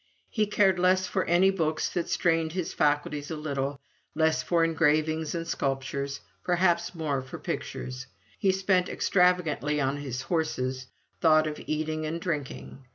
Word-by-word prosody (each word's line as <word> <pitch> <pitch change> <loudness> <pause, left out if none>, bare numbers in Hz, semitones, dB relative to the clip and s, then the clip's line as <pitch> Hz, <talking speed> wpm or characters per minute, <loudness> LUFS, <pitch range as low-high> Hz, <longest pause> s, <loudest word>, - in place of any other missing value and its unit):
He 215 -2 +1
cared 195 -3 +3
less 185 +1 +3
for 185 0 -1
any 180 +3 +4
books 160 -5 0
that 175 - -3
strained 165 -2 +1
his 180 -2 -3
faculties 145 0 0
a 160 - -3
little 140 -2 -3 0.4
less 160 0 +2
for 170 -1 +2
engravings 160 0 +1
and 165 0 -3
sculptures 140 -1 -2 0.2
perhaps 175 0 +1
more 150 -5 -1
for 130 - -8
pictures. 125 0 -5 0.3
He 195 - +3
spent 185 -1 +1
extravagantly 180 -5 +2
on 135 0 0
his 135 -2 -4
horses; 130 -5 -2 0.3
"thought 155 -1 +5
of 150 -1 -4
eating 155 0 -2
and 165 +2 -3
drinking." 150 -6 -4
160 Hz, 150 wpm, -28 LUFS, 145-175 Hz, 0.4 s, thought